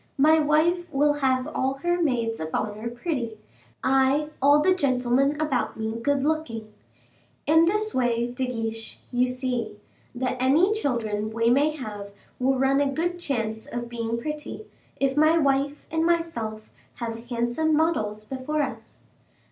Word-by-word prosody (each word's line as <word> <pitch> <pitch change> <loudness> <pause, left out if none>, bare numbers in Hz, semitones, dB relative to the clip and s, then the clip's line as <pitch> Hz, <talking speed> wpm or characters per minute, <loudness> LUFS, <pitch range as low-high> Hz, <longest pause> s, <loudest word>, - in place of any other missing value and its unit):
My 310 +3 +5
wife 325 +3 +2
will 290 +1 +3
have 260 -3 +1
all 270 -3 -1
her 350 0 +1
maids 235 -7 0
of 160 - -4
honor 215 +2 -2
pretty; 240 -3 -3 0.5
I, 270 +3 +3
all 285 +2 +6
the 370 - +5
gentlemen 275 -2 +1
about 300 -5 -1
me 220 0 -2
good 280 +1 +1
looking. 240 -9 -2 0.7
In 320 +2 +5
this 425 +4 +2
way, 240 -2 +1
De 245 +2 -3
Guiche, 225 -2 -4
you 250 0 +2
see, 250 -4 -3 0.4
that 255 +1 -2
any 305 +11 +4
children 225 - -1
we 230 +1 +1
may 285 +4 +4
have 210 -7 -7 0.3
will 265 +1 +2
run 270 +2 +3
a 280 -1 +1
good 350 +4 -2
chance 225 -8 -3
of 240 0 -5
being 230 -1 -3
pretty, 300 - -6 0.3
if 270 -1 +1
my 310 +2 +5
wife 280 -1 +1
and 320 0 +1
myself 285 -11 -1 0.3
have 230 0 -6
handsome 245 +6 +1
models 215 -10 0
before 270 +5 -2
us." 270 - -8
265 Hz, 150 wpm, -25 LUFS, 235-305 Hz, 0.7 s, all